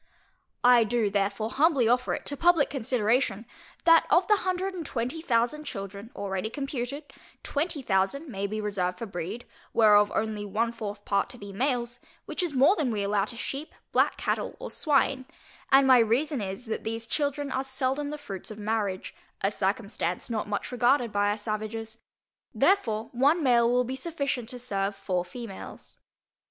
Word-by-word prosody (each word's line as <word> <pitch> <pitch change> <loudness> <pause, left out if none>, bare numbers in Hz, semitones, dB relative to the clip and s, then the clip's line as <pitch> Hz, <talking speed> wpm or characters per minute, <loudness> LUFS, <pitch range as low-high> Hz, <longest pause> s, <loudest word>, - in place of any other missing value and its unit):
I 245 -1 +7
do 220 -1 0
therefore 205 +2 0
humbly 280 -5 +3
offer 250 +2 +2
it - - -8
to 285 - -3
publick 335 -1 +3
consideration, 235 -4 0 0.4
that 330 -1 +6
of 355 +1 +4
the 420 - +5
hundred 375 0 -1
and 355 -3 -5
twenty 255 +3 -3
thousand 250 +1 +1
children, 200 -2 -6
already 200 +1 -3
computed, 275 +2 -4 0.4
twenty 295 -1 -2
thousand 195 +10 0
may 200 -6 -3
be 215 +2 -4
reserved 190 -4 -1
for 230 - -5
breed, 195 +4 -5 0.3
whereof 210 -2 +6
only 215 -1 -1
one 215 +3 0
fourth 210 -3 -6
part 200 +2 +1
to 245 - -10
be 200 -3 -9
males; 245 +1 -1 0.3
which - - -3
is 350 -3 -1
more 280 +10 +6
than 300 -8 0
we 210 -3 -1
allow 200 0 +1
to 235 - -9
sheep, 275 +6 -5 0.2
black - - +2
cattle, - - -2
or - - -7
swine, 275 -3 +1 0.5
and 270 0 +7
my 260 -2 +7
reason 250 +5 +1
is, 195 +4 -5
that 220 - -4
these 225 +1 -3
children 285 +1 -1
are 260 +1 -1
seldom 265 +2 -1
the 300 - -4
fruits 200 -10 -8
of 215 - -8
marriage, 210 -3 -2 0.3
a 195 - +1
circumstance 200 -1 -2
not 215 -2 -2
much 205 +4 -3
regarded 245 -1 +2
by 205 0 +2
our 205 - 0
savages, 220 +1 -4 0.6
therefore, 225 - +2
one 290 +7 +3
male 235 -3 +4
will 250 +1 +3
be 255 +2 -4
sufficient 275 -5 -2
to 250 - -5
serve 200 -5 -2
four 190 -2 -1
females. 195 +2 -9
235 Hz, 175 wpm, -27 LUFS, 205-275 Hz, 0.6 s, I